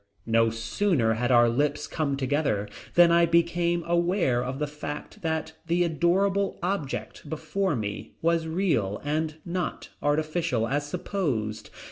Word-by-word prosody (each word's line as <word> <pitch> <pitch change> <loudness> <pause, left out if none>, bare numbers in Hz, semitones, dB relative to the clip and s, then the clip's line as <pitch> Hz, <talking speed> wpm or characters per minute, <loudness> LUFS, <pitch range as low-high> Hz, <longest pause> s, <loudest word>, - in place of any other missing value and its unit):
No 115 0 +3
sooner 115 - +1
had 120 +3 0
our 120 -1 +6
lips 145 +5 0
come 140 -4 -1
together 135 -6 0 0.3
than 175 -1 +7
I 170 0 +5
became 170 +1 +2
aware 170 -7 +2
of 130 +1 -4
the 150 - -1
fact 150 +7 -7
that 160 -1 -2
the 175 +1 +2
adorable 190 +5 +1
object 160 -5 -3
before 160 +3 -1
me 105 -1 -5
was 165 0 +1
real 160 - 0
and 155 +1 -1
not 175 0 -3
artificial 155 -4 0
as 145 +3 -1
supposed. 140 - -2
155 Hz, 135 wpm, -27 LUFS, 125-170 Hz, 0.3 s, than